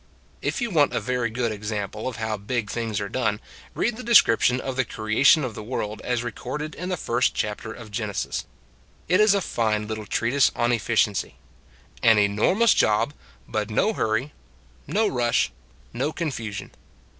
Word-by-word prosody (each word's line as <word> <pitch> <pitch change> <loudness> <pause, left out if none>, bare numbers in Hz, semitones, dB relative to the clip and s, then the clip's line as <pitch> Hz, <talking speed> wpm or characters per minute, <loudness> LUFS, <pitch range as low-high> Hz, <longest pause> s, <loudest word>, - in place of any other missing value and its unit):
If - - -2
you 240 -2 -1
want 150 -5 +3
a - - +2
very 120 +1 -1
good 115 0 -1
example 105 +1 -4
of 130 - -4
how 110 -1 -2
big 105 +1 -3
things 115 -3 -2
are 100 - -3
done, 110 -2 -1 0.4
read 235 -1 0
the 250 - -7
descrip 220 - +5
tion 125 +1 +3
of 130 0 -4
the 130 - +2
creation 115 +7 +3
of 125 -3 -3
the 110 - -7
world 105 -2 -4
as 120 -1 -1
re 120 - -3
corded 150 +7 -5
in 180 +1 -5
the 180 - -1
first 120 -2 0
chapter 105 +1 -3
of 115 -2 -10
Genesis. 105 -2 -3 0.6
It 180 +3 +3
is 215 -1 +5
a 200 - +1
fine 110 -8 -1
little 110 -1 -5
treatise 130 +4 +2
on 120 +1 +1
efficiency. 110 -3 +1 0.7
An 110 -1 +6
enormous 105 - +3
job, 110 +7 +2 0.3
but 105 -1 -2
no 205 - +2
hurry, 115 - -1 0.5
no 215 +2 +2
rush, 120 -5 +1 0.4
no 135 +6 -1
confusion. 115 - -4
115 Hz, 175 wpm, -24 LUFS, 110-135 Hz, 0.7 s, An